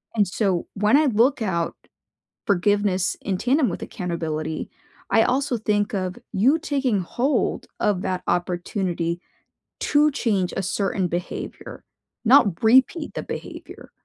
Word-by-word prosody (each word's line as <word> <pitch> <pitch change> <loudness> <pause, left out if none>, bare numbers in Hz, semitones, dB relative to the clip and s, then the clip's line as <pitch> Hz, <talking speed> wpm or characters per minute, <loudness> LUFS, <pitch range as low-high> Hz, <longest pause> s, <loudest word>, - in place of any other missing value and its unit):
And 205 -3 +3
so 185 -2 0
when 210 +6 +3
I 310 - +4
look 255 +2 +3
out 170 -6 -1 0.7
forgiveness 200 -1 +1
in 190 -2 -2
tandem 260 +5 +2
with - - -5
accountability, 160 -5 -4 0.4
I 225 - +5
also 265 +1 0
think 210 0 0
of 185 -2 -2 0.2
you 255 +11 +3
taking 275 -9 0
hold 240 - -1
of 205 -4 +1
that 185 -1 -2
opportunity 175 -1 -1 0.6
to 295 +1 +3
change 205 -9 0
a 195 - -2
certain 195 0 -1
behavior, 175 +1 -6 0.4
not 230 - +4
repeat 260 +8 +4
the - - -4
behavior. - - -8
205 Hz, 130 wpm, -23 LUFS, 180-245 Hz, 0.7 s, I